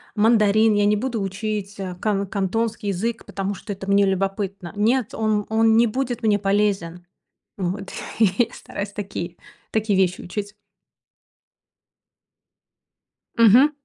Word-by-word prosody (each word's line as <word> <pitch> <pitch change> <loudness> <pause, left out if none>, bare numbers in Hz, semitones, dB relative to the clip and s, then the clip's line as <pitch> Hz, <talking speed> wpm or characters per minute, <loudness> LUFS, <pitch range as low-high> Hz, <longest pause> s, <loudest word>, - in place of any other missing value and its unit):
мандарин, 215 0 +4
я 205 0 +3
не 210 +1 +4
буду 230 -1 -2
учить, 205 +1 -4
а, 185 -2 -4
кан 200 +2 -1
кантонский 210 +3 -2
язык, 220 +5 -2
потому 195 +1 -3
что 205 - -8
это 195 0 -6
мне 200 0 +4
любопытно. 195 -1 -2
Нет, 225 +3 +1
он 215 -2 0
он 225 0 +4
не 235 - +6
будет 245 +1 -2
мне 210 -2 +3
полезен. 195 -4 0 0.5
Вот 195 +2 -3 0.3
и 210 -4 +6
я 240 - +5
стараюсь 200 0 -6
такие 180 -4 -5 0.3
такие 215 -3 +1
вещи 180 -1 +2
учить. 205 +3 -5 2.8
Мгм. 235 +6 +7
205 Hz, 130 wpm, -22 LUFS, 195-220 Hz, 2.8 s, Мгм